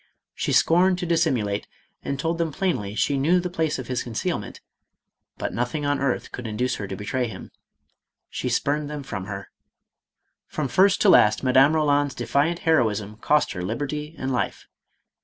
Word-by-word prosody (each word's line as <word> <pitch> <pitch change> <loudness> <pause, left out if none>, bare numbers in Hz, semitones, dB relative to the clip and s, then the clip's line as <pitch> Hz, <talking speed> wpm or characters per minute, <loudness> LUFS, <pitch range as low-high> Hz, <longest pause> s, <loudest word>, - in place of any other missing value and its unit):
She - - -2
scorned 180 +2 +4
to 180 - -3
dissimulate 135 -12 0 0.3
and 140 - -4
told 165 +3 -1
them 165 -2 0
plainly 125 - -2
she 140 +4 +1
knew 170 +7 +3
the 180 0 -4
place 160 -3 -1
of 130 - -6
his 125 -1 -1
concealment, 115 -3 -4 0.8
but - - -3
nothing 125 +5 -2
on 145 0 +1
earth 140 -2 -1
could 125 -2 -6
induce 125 +4 -1
her 100 - -5
to 95 - -5
betray 120 +6 -2
him; 95 -4 -9 0.8
she - - -4
spurned 145 +1 0
them 150 -1 -5
from 100 -8 -5
her. 100 -1 -7 1.0
From 150 -3 -3
first 190 +8 +3
to 205 - +5
last 105 - +5
Madame 135 +3 +5
Eoland's 145 -2 +2
defiant 160 +5 0
heroism 110 -9 +1
cost 150 +6 +2
her 90 - -5
liberty 145 - -4
and 130 0 -2
life. 125 - -2
140 Hz, 170 wpm, -24 LUFS, 115-160 Hz, 1.0 s, to